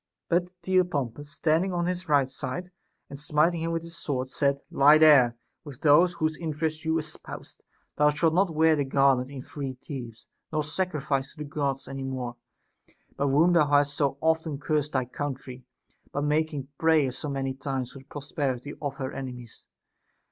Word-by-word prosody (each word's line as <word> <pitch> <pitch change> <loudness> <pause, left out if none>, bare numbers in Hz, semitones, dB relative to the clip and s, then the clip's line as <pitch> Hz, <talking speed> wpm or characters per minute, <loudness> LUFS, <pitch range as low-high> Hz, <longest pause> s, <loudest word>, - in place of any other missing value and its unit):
But 175 +1 +2
Theopompus, 145 -8 0
standing 165 +3 +1
on 175 -1 0
his 180 -1 -3
right 140 -3 +4
side 180 +7 -5 0.4
and 140 - -9
smiting 155 +3 +2
him 165 0 -1
with 165 0 -2
his 170 0 -9
sword, 130 -5 -3
said: 140 -1 +1
Lie 145 +3 +7
there, 140 -7 +6 0.3
with 145 -6 -11
those 165 +4 +5
whose 155 -2 -1
interest 155 -1 -3
you 160 0 +1
espoused; 155 -1 -8 0.4
thou 150 0 +5
shalt 160 +2 +2
not 190 +2 +3
wear 160 0 +5
the 145 - +1
garland 135 -1 +3
in 135 -2 -8
freed 135 -4 -6
Thebes, 120 -6 -8 0.2
nor 155 -1 0
sacrifice 150 -4 -2
to - - -26
the 150 - -5
Gods 140 -2 -2
any 135 0 -6
more, 130 -2 -4 0.8
by 140 - -1
whom 155 +6 +4
thou 160 -4 +4
hast 145 0 +3
so 140 -2 0
often 160 -2 +1
curst 150 0 -1
thy 130 -2 +1
country, 130 -1 -6 0.5
by 145 - -2
making 150 -2 0
prayers 155 -6 +3
so 150 - -4
many 135 -1 -2
times 135 -2 -4
for 140 - -11
the 135 - -17
pros 145 +1 -9
perity 140 -1 -2
of 140 -2 -3
her 130 -1 -4
enemies. 125 -4 -8
145 Hz, 175 wpm, -27 LUFS, 135-160 Hz, 0.8 s, Lie